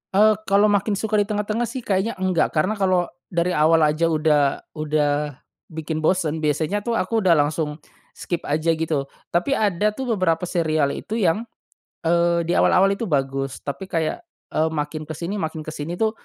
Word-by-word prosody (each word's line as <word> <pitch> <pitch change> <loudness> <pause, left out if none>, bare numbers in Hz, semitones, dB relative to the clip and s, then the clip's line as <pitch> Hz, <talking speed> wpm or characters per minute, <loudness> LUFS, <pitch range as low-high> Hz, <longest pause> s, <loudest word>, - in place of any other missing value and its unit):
Eee, 215 +2 +6
kalau 205 +2 +4
makin 205 +1 +1
suka 215 +1 0
di 205 - +1
tengah-tengah 215 +2 -1
sih 245 +2 -6
kayaknya 200 +2 0
enggak 185 -3 0
karena 185 +8 +1
kalau 185 -2 +1 0.2
dari 170 0 0
awal 160 0 +4
aja 155 +2 +2
udah 150 -3 +2
udah 150 -2 -1 0.3
bikin 160 -1 -4
bosen 160 -1 +1
biasanya 155 +6 0
tuh 230 +3 -2
aku 225 +2 0
udah 185 -5 +4
langsung 150 0 0 0.4
skip 175 - -3
aja 155 +3 +1
gitu. 160 -3 -1 0.3
Tapi 175 +11 +1
ada 210 -5 +2
tuh 240 +1 -2
beberapa 180 -2 0
serial 155 -5 0
itu 225 +2 -4
yang, 200 +2 +2 0.6
eee, 170 0 +2
di 170 - -2
awal-awal 195 +2 +4
itu 205 +3 -2
bagus 135 -3 -2
tapi 140 +7 -5
kayak, 165 -4 -1 0.3
eee, 155 - +1
makin 155 0 -4
ke 155 - -5
sini 180 +7 -4
makin 160 -2 -4
ke 155 - -6
sini 155 +3 -5
tuh 220 +4 +1
170 Hz, 175 wpm, -22 LUFS, 155-200 Hz, 0.6 s, Eee